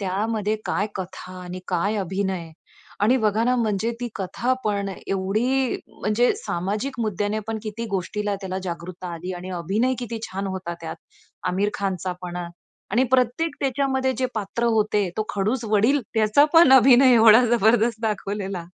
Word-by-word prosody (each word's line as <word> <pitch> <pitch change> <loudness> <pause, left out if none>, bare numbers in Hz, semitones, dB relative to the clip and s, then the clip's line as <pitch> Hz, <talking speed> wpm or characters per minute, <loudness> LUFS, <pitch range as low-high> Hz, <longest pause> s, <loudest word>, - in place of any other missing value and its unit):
त्यामध्ये 210 +2 -1
काय 205 - 0
कथा 185 -1 -7
आणि 180 +1 -7
काय 195 +4 0
अभिनय 190 -3 -2 0.5
आणि 235 +5 +5
बघा 220 -1 +1
ना 250 +1 +2
म्हणजे 220 -1 0
ती 245 - -2
कथापण 210 0 -1 0.2
एवढी 225 +7 0
म्हणजे 215 +4 +1
सामाजिक 215 - -3
मुद्द्यानेपण 215 +1 -2
किती 220 +1 -5
गोष्टीला 205 +2 -2
त्याला 190 -1 -4
जागृतता 180 +1 -6
आली 180 +3 -6
आणि 180 +1 -7
अभिनय 210 +10 0
किती 235 -2 -4
छान 195 +1 -3
होता 185 -2 -4
त्यात. 160 -1 -6 0.5
आमिर 200 +3 0
खानचा 185 -2 -2
पण 175 -1 -5
अ, 175 -1 -4 0.4
आणि 245 +6 +3
प्रत्येक 260 +5 +1
त्याच्यामध्ये 265 -1 0
जे 255 - +1
पात्र 215 +2 -2
होते 210 -2 +1
तो 215 - 0
खडूस 215 +5 0
वडील. 220 +7 +3
त्याचा 220 +6 +4
पण 325 -5 +8
अभिनय 260 0 +7
एवढा 225 +1 +7
जबरदस्त 230 0 +3
दाखवलेला. 200 -4 -3
210 Hz, 145 wpm, -23 LUFS, 190-240 Hz, 0.5 s, पण